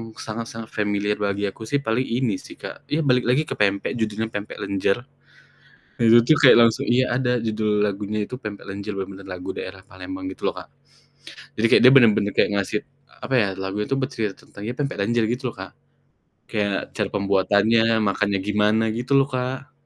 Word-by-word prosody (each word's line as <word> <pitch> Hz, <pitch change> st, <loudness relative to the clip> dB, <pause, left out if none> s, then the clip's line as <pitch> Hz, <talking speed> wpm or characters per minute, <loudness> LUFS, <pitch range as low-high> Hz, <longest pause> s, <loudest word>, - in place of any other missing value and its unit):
sangat-sangat 115 Hz, 0 st, -7 dB
familiar 105 Hz, 0 st, -1 dB
bagi 100 Hz, 0 st, -1 dB
aku 110 Hz, +3 st, -10 dB
sih, 140 Hz, +3 st, -1 dB
paling 125 Hz, +2 st, 0 dB
ini 115 Hz, -5 st, -1 dB
sih -, -, -12 dB
Kak, -, -, -10 dB
ya 155 Hz, -, 0 dB
balik 125 Hz, -3 st, +2 dB
lagi 130 Hz, +5 st, +3 dB
ke -, -, -3 dB
pempek, 100 Hz, +4 st, +1 dB
judulnya 110 Hz, 0 st, -2 dB
"Pempek 105 Hz, 0 st, -6 dB
Lenjer." 100 Hz, 0 st, 0 dB, 1.0 s
Itu 115 Hz, 0 st, +6 dB
tuh 155 Hz, +5 st, +4 dB
kayak 140 Hz, -4 st, +8 dB
langsung 115 Hz, -1 st, +3 dB
iya, 125 Hz, +1 st, +2 dB
ada 125 Hz, -2 st, 0 dB
judul 110 Hz, -2 st, 0 dB
lagunya 105 Hz, +1 st, -2 dB
itu, 125 Hz, +5 st, -6 dB
"Pempek 105 Hz, -5 st, -7 dB
Lenjer," 100 Hz, +2 st, -5 dB
bener-bener 95 Hz, 0 st, -7 dB
lagu 90 Hz, 0 st, -7 dB
daerah 95 Hz, 0 st, -7 dB
Palembang, 280 Hz, -, -7 dB
gitu -, -, -4 dB
loh -, -, -2 dB
Kak. -, -, -14 dB, 0.9 s
Jadi, 110 Hz, -, +3 dB
kayak -, -, +5 dB
dia 130 Hz, -, +9 dB
bener-bener 110 Hz, -5 st, +5 dB
kayak -, -, +2 dB
ngasih, 100 Hz, +1 st, -1 dB, 0.4 s
apa 135 Hz, -, -3 dB
ya, 110 Hz, -5 st, +3 dB
lagu 95 Hz, +1 st, -4 dB
itu 105 Hz, -, -6 dB
bercerita 110 Hz, -6 st, -4 dB
tentang, 100 Hz, -, -12 dB
ya 115 Hz, -, -3 dB
"Pempek 140 Hz, -2 st, -2 dB
lenjer," 115 Hz, +2 st, +1 dB
gitu 125 Hz, +1 st, -2 dB
loh -, -, -22 dB
Kak, 95 Hz, -, -7 dB, 0.8 s
kayak 100 Hz, -2 st, -2 dB
cara -, -, 0 dB
pembuatannya, 105 Hz, +3 st, +2 dB
makannya 100 Hz, -1 st, +1 dB
gimana, 105 Hz, +2 st, +2 dB
gitu 125 Hz, +5 st, -2 dB
loh 135 Hz, +1 st, +3 dB
Kak. 130 Hz, +3 st, -4 dB
110 Hz, 185 wpm, -23 LUFS, 100-125 Hz, 1.0 s, dia